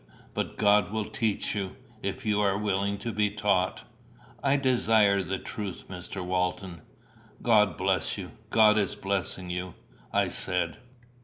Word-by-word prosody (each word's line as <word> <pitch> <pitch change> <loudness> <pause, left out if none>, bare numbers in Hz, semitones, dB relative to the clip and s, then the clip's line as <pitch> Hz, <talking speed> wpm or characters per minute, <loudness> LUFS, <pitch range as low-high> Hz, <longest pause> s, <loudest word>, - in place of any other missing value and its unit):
But - - -3
God 105 -3 +4
will 110 -1 -1
teach 110 -6 -1
you, 100 -3 -3 0.3
if 100 +6 -4
you 105 -1 +2
are 100 -1 +2
willing 100 -1 0
to 115 +3 -4
be 105 -1 +2
taught." 100 -3 0 0.6
"I 140 0 +3
desire 110 -7 +3
the 95 +1 -2
truth, 100 -2 -6
Mr. 90 0 -6
Walton." 90 -1 -2 0.6
"God 105 -7 +4
bless - - 0
you! - - -6 0.2
God 110 -1 +6
is 100 - 0
blessing 95 -2 -2
you," 90 0 -4 0.4
I - - +2
said. - - -1
100 Hz, 145 wpm, -28 LUFS, 95-105 Hz, 0.6 s, God